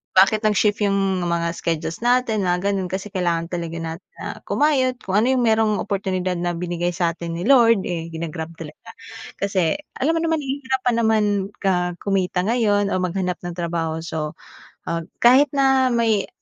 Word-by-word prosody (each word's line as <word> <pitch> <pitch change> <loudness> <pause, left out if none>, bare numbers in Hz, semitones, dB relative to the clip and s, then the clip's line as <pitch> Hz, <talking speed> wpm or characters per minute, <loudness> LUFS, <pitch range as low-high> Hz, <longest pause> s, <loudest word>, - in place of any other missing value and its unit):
bakit 205 +4 +5
nag-shift 210 0 +2
iyong 195 -2 +1
mga 170 0 0
schedules 165 -1 -3
natin, 245 -3 +2
mga 180 +2 +1
ganun, 190 -2 -1
kasi 190 +2 -4
kailangan 170 -3 -1
talaga 170 -2 -4
natin 165 +2 -7
na - - -8 0.2
kumayod. 270 -4 +2
Kung 190 +2 +1
ano 225 - +2
iyong 255 -2 +2
merong 220 -1 +3
oportunidad 185 -2 -2
na 175 0 -1
binigay 175 0 -2
sa 170 -1 +1
atin 170 -1 -5
ni 175 - -4
Lord 230 -6 +5
eh, 165 -2 -4
gina-grab 160 0 -5
talaga. 160 +7 -10 0.5
Kasi 190 -4 +1 0.2
alam 305 +5 +1
mo - - +1
naman 325 -1 +1
hi 275 0 -4
hirap 260 0 -1
pa - - +5
naman, 220 -2 +2 0.4
ah, 180 -1 +1
kumita 190 -2 0
ngayon 210 -4 +2
o 185 - +1
maghanap 180 0 -1
ng 175 -1 -5
trabaho. 165 -1 -2
So, 155 -2 -4 0.5
ah, 170 0 -1 0.2
kahit 260 +5 +7
na 265 -1 +4
may 225 -4 +1
190 Hz, 175 wpm, -22 LUFS, 170-230 Hz, 0.5 s, kahit